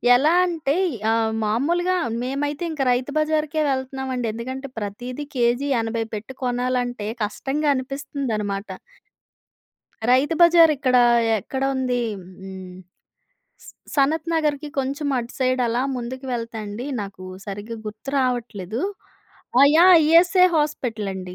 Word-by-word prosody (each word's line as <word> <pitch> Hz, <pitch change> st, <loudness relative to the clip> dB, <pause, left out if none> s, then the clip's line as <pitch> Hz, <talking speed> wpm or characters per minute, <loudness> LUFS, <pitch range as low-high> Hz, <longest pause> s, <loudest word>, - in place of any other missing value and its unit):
ఎలా 295 Hz, +6 st, +3 dB
అంటే 320 Hz, -6 st, -1 dB, 0.2 s
య్ -, -, -6 dB
ఆహ్, 225 Hz, 0 st, +1 dB
మామూలుగా 335 Hz, +12 st, +1 dB, 0.3 s
మేమైతే 285 Hz, +4 st, -2 dB
ఇంక 305 Hz, -3 st, -4 dB
రైతు 250 Hz, +3 st, -1 dB
బజార్‌కే 310 Hz, 0 st, 0 dB
వెళ్తున్నామండి. 260 Hz, -2 st, -2 dB
ఎందుకంటే 260 Hz, +4 st, -6 dB
ప్రతీదీ 245 Hz, +7 st, -5 dB
కేజీ 245 Hz, +3 st, +1 dB
80 225 Hz, 0 st, -2 dB
పెట్టి 215 Hz, +5 st, -6 dB
కొనాలంటే 245 Hz, -2 st, -1 dB, 0.2 s
కష్టంగా 280 Hz, +8 st, -1 dB
అనిపిస్తుందన్నమాట. 260 Hz, -7 st, -3 dB, 1.4 s
రైతు 270 Hz, +5 st, +3 dB
బజార్ 340 Hz, -2 st, +7 dB
ఇక్కడ 260 Hz, -2 st, +2 dB, 0.4 s
ఎక్కడ 265 Hz, +7 st, -5 dB
ఉంది? 255 Hz, -2 st, 0 dB, 0.2 s
హ్మ్. 185 Hz, +1 st, -14 dB
హ్మ్. 190 Hz, -1 st, -9 dB, 0.9 s
స్ -, -, -10 dB, 0.2 s
సనత్ 305 Hz, +3 st, +1 dB
నగర్‌కి 300 Hz, -2 st, 0 dB
కొంచెం 280 Hz, +2 st, -2 dB
అటు 240 Hz, 0 st, -5 dB
సైడ్ 255 Hz, -1 st, +1 dB
అలా 235 Hz, +2 st, 0 dB
ముందుకు 255 Hz, +2 st, -6 dB
వెళ్తే 230 Hz, -1 st, -4 dB
అండి, 210 Hz, +5 st, -6 dB
నాకు 195 Hz, -2 st, -8 dB, 0.2 s
సరిగ్గా 205 Hz, +3 st, -6 dB
గుర్తు 215 Hz, +5 st, -7 dB
రావట్లేదు. 235 Hz, -5 st, -2 dB, 0.8 s
ఆ! -, -, +8 dB
యాహ్! 360 Hz, +2 st, +8 dB
ఇఎస్ఐ 355 Hz, +3 st, +6 dB
హాస్పిటల్ 245 Hz, -9 st, -2 dB
అండి. 185 Hz, -1 st, -7 dB
255 Hz, 125 wpm, -22 LUFS, 225-290 Hz, 1.4 s, ఆ